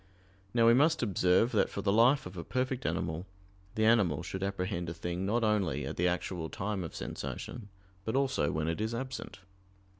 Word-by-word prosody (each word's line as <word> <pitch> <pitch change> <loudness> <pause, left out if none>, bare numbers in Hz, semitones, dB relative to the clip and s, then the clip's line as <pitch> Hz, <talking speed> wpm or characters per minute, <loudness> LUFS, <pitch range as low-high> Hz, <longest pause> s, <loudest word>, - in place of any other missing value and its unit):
Now 115 +1 +3
we 115 - +7
must 145 +3 +4
observe 95 +2 +3
that 110 - +2
for 100 - -5
the 100 - +2
life 120 +6 +4
of 90 +1 -8
a 85 - -5
perfect 130 - -1
animal, 80 +3 -2 0.5
the 110 - +2
animal 100 -9 +3
should 95 +1 -5
apprehend 95 -3 -2
a 85 - -5
thing 90 +2 -3
not 115 +3 +1
only 95 -10 +1
at - - -4
the 90 - +2
actual 90 -2 -2
time 100 -1 -3
of 80 - -7
sensation, 115 -5 -6 0.3
but 110 +5 -2
also 130 - +1
when 80 +1 -1
it 85 +5 -1
is 110 +2 -1
absent. 130 -6 -6
100 Hz, 190 wpm, -31 LUFS, 90-115 Hz, 0.5 s, we